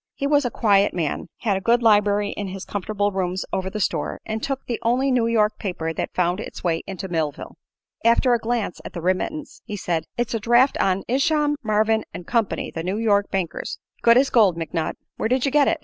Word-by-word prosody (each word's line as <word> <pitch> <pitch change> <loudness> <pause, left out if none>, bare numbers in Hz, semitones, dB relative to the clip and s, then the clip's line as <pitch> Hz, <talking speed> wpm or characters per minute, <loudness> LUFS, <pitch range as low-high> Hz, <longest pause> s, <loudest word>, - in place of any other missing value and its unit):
He 280 - -3
was 290 -1 +3
a - - +1
quiet 205 -5 +3
man, 165 -4 -2
had 200 -4 +1
a - - -5
good 235 +4 +2
library 205 -2 +3
in 205 - -4
his 190 0 -7
comfortable 205 +1 -1
rooms 185 -1 -2
over 190 0 -1
the 210 - -5
store, 165 -6 -1
and 220 0 -3
took 270 +1 -3
the 235 - -3
only 255 +4 +2
New 240 -2 +2
York 215 -2 +2
paper 165 -4 -3
that - - -4
found 180 +1 +1
its - - -8
way 165 -2 0
into 190 0 -5
Millville. 160 -5 -3 0.5
After 235 +2 +4
a 240 - +2
glance 225 -4 -2
at - - -8
the 170 - -5
remittance 185 - -2
he 210 - -6
said: 165 -4 -2
"It's 240 0 -1
a 230 - 0
draft 240 +5 +4
on 190 0 +1
Isham, 295 +3 +2
Marvin 220 0 +2
& 175 - -10
Company, 230 -1 -1
the 165 - -4
New 185 +4 -2
York 205 -3 +2
bankers. 185 -4 -3 0.2
Good 235 0 +6
as 270 +1 +3
gold, 205 -8 +4
McNutt. 165 0 -2 0.2
Where 220 - -1
did 255 +1 +2
you 275 - +1
get 290 0 +4
it?" 330 - +2
210 Hz, 220 wpm, -23 LUFS, 185-240 Hz, 0.5 s, Good